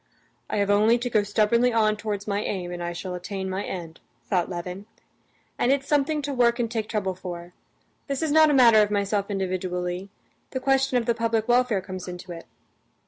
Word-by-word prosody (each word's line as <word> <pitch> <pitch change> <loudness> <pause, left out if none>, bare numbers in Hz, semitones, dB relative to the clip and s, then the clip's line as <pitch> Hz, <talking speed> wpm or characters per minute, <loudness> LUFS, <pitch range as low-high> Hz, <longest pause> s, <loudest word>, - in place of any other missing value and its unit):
"I - - -1
have 200 0 +2
only 215 +3 +4
to 245 0 -4
go 215 - +4
stubbornly 215 +4 +2
on 215 -2 +2
towards 210 -1 -4
my 200 0 0
aim, 180 -4 -3
and 175 0 -5
I 175 0 -3
shall 180 +2 -5
attain 190 +2 -5
my 190 +2 -2
end," 170 -3 -6 0.3
thought 180 -3 0
Levin; 180 +3 -6 0.7
"and 245 - +3
it's 275 0 0
something 295 +1 +1
to 285 0 -3
work 240 -2 +3
and 235 -2 -1
take 220 -2 -3
trouble 195 -4 -1
for. 175 -1 -8 0.5
This 275 +1 -2
is 315 - 0
not 315 0 +6
a - - +3
matter 230 -4 +7
of 210 - +2
myself 200 0 0
individually; 185 -1 -3 0.4
the 260 - -3
question 270 -1 +2
of 235 - 0
the 235 - +2
public 230 -1 0
welfare 245 -4 +3
comes 185 -1 -7
into 180 0 -8
it. 165 -1 -9
210 Hz, 200 wpm, -25 LUFS, 185-240 Hz, 0.7 s, matter